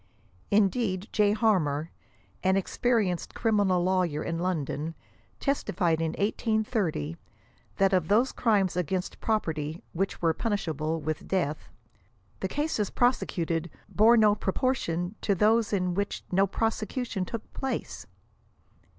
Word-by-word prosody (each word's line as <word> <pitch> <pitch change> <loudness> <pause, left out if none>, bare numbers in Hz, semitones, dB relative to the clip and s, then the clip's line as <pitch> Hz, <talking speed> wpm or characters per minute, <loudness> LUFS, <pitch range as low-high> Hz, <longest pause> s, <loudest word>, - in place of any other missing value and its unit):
Indeed 200 -1 +1
J. 210 -1 +3
Harmar, 170 -9 +1 0.5
an 190 +1 +3
experienced 200 -3 0
criminal 205 -6 +2
lawyer 180 -5 +1
in 165 0 -3
London, 160 -3 -2 0.4
testified 175 - 0
in 160 -1 -1
1830, 205 - -1 0.6
that 195 0 +3
of 180 -4 +2
those 230 +7 +3
crimes 205 -7 +2
against 180 +1 -2
property 160 -7 -1
which 190 +3 -2
Avere 165 -2 +2
punishable 160 - -1
with 155 +3 -4
death, 160 -6 -1 0.3
" 95 0 -36
the 190 - -1
cases 290 -5 -1
prosecuted 170 -9 0 0.2
bore 225 +3 +5
no 215 -2 +6
pro' 195 -2 -2
portion 175 -9 -1
to 200 - +1
those 220 +3 +3
in 180 -3 0
which 200 +2 -2
no 195 +2 +3
prosecution 225 -1 -2
look 230 -2 -6
place." 270 -1 -4
190 Hz, 125 wpm, -28 LUFS, 165-215 Hz, 0.6 s, no